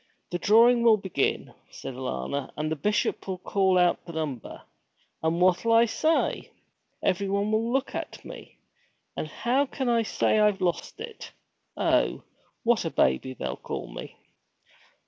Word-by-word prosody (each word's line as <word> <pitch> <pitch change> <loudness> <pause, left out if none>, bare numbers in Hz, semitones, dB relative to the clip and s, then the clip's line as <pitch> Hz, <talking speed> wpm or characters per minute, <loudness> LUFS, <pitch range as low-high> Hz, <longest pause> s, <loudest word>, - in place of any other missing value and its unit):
'The 175 - -2
drawing 235 +6 +5
will 230 -2 +6
begin,' 190 -8 -1 0.2
said - - -8
Alanna, 130 - -4
'and 155 +1 -2
the - - +1
Bishop 210 +7 -1
will 190 -1 -3
call 190 0 +1
out 180 -1 +3
the 170 - -10
number! 150 -7 -5 0.6
And 160 +1 0
what'll 185 +5 +3
I 230 +1 +6
say? 315 +8 0 0.5
Everyone 200 +2 0
will 225 +2 +1
look 270 +1 0
at - - -6
me; - - -11 0.6
and - - -3
how 245 - 0
can 265 0 -3
I 235 -1 +3
say 220 -1 +1
I've 210 -2 +3
lost 180 - -2
it! 460 -1 -8 0.4
Oh, - - +1 0.4
what 235 -1 +3
a 165 - -1
baby 100 - +1
they'll 65 - -4
call - - -6
me!' - - -9
195 Hz, 150 wpm, -27 LUFS, 160-230 Hz, 0.6 s, will